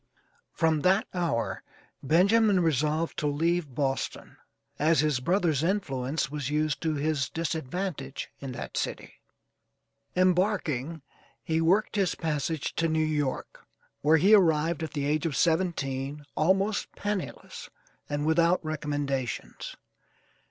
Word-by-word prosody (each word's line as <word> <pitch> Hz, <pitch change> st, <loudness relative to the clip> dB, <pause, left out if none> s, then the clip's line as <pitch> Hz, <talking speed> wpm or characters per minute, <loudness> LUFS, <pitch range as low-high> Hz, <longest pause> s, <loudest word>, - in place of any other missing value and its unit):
From 160 Hz, -2 st, +2 dB
that 190 Hz, +6 st, +3 dB
hour 170 Hz, -11 st, -1 dB, 0.4 s
Benjamin 195 Hz, +6 st, +4 dB
resolved 155 Hz, +1 st, 0 dB
to 150 Hz, -, 0 dB
leave 155 Hz, -1 st, 0 dB
Boston, 135 Hz, -2 st, -2 dB, 0.4 s
as 160 Hz, +1 st, +4 dB
his 150 Hz, -4 st, +1 dB
brother's 170 Hz, 0 st, +1 dB
influence 145 Hz, -6 st, -1 dB
was 145 Hz, -2 st, -3 dB
used 150 Hz, 0 st, 0 dB
to 160 Hz, -2 st, 0 dB
his 145 Hz, -1 st, 0 dB
disadvantage 160 Hz, -2 st, -4 dB
in 135 Hz, -2 st, -6 dB
that -, -, -6 dB
city. -, -, -4 dB, 0.9 s
Embarking, 180 Hz, -, +1 dB, 0.4 s
he 160 Hz, 0 st, 0 dB
worked 195 Hz, +6 st, +2 dB
his 195 Hz, -3 st, +1 dB
passage 155 Hz, -1 st, -2 dB
to 165 Hz, -, +2 dB
New 160 Hz, -1 st, +1 dB
York, 150 Hz, -4 st, -3 dB, 0.3 s
where 155 Hz, +2 st, +5 dB
he 195 Hz, +7 st, +5 dB
arrived 165 Hz, -4 st, +4 dB
at 160 Hz, -, -4 dB
the 145 Hz, -2 st, -2 dB
age 150 Hz, +2 st, +1 dB
of 150 Hz, -, -3 dB
seventeen, 145 Hz, -5 st, 0 dB
almost 195 Hz, +6 st, +1 dB
penniless, 205 Hz, -2 st, -5 dB, 0.4 s
and 145 Hz, 0 st, -1 dB
without 170 Hz, +2 st, +3 dB
recommendations. 145 Hz, -4 st, -3 dB
155 Hz, 120 wpm, -28 LUFS, 145-175 Hz, 0.9 s, where